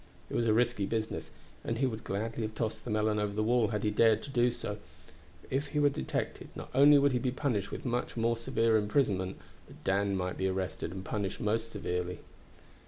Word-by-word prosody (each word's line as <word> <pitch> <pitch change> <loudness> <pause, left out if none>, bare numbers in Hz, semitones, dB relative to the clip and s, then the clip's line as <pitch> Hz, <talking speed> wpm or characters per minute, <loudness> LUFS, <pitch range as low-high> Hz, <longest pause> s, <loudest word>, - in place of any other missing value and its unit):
It - - -3
was 115 - +2
a 110 - +4
risky 120 -4 +2
business, 110 0 -2 0.3
and 115 - -2
he 135 - +2
would 110 -4 -3
gladly 110 +4 -3
have 110 -1 -3
tossed 110 -1 -2
the - - -5
melon 105 0 +1
over 105 -1 -1
the 110 +1 0
wall 120 0 +3
had 105 -2 -2
he 105 - +2
dared 110 0 +4
to 140 - -7
do 120 -2 +3
so; 105 -3 -4 0.6
for - - -18
if 140 +3 0
he 150 +1 -1
were 145 -1 +5
detected, 65 - -3
not - - -8
only 145 +3 +8
would 140 0 +4
he 125 - +1
be 130 - 0
punished 125 -6 -1
with - - -6
much 120 0 -2
more 115 +1 +2
severe 115 -1 +2
imprisonment, 105 -4 +1 0.3
but - - -15
Dan 100 0 +1
might 90 -1 -2
be 95 - +1
arrested 95 -2 -2
and 95 +1 -7
punished 100 -3 -2
most 115 +2 0
severely. 90 -4 -3
110 Hz, 220 wpm, -31 LUFS, 100-120 Hz, 0.6 s, only